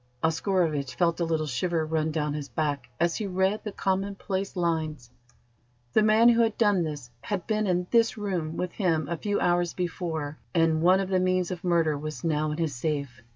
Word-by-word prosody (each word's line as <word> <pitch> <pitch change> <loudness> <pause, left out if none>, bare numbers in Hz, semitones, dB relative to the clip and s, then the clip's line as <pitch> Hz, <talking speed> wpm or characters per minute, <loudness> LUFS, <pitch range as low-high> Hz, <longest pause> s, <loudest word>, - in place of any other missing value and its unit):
Oscarovitch 160 -4 0
felt 170 -1 +1
a 170 - +1
little 160 -1 0
shiver 160 +4 -1
run 160 0 0
down 150 -1 -1
his 145 -1 -5
back 145 -5 -2
as 170 0 +1
he 210 - -3
read 190 +3 0
the 210 - -4
commonplace 195 0 -2
lines. 155 -8 -2 0.8
The - - +5
man 220 +2 +6
who 235 0 +4
had 225 -2 +1
done 205 -5 +3
this 145 -7 -5
had 200 -4 -3
been 215 -1 0
in 180 -1 +1
this 230 -1 +3
room 180 -6 -3
with 180 -1 -2
him 165 -6 0
a 170 - -2
few 205 +5 -1
hours 175 -1 +1
before, 160 -4 -3 0.2
and 165 -1 +3
one 185 +3 +5
of 190 - -3
the 185 -1 +2
means 185 0 +1
of 180 -2 -5
murder 165 -4 +2
was 155 +2 -6
now 155 -2 +1
in 150 - -3
his 160 -4 -1
safe. 140 -2 -3
170 Hz, 200 wpm, -27 LUFS, 155-190 Hz, 0.8 s, man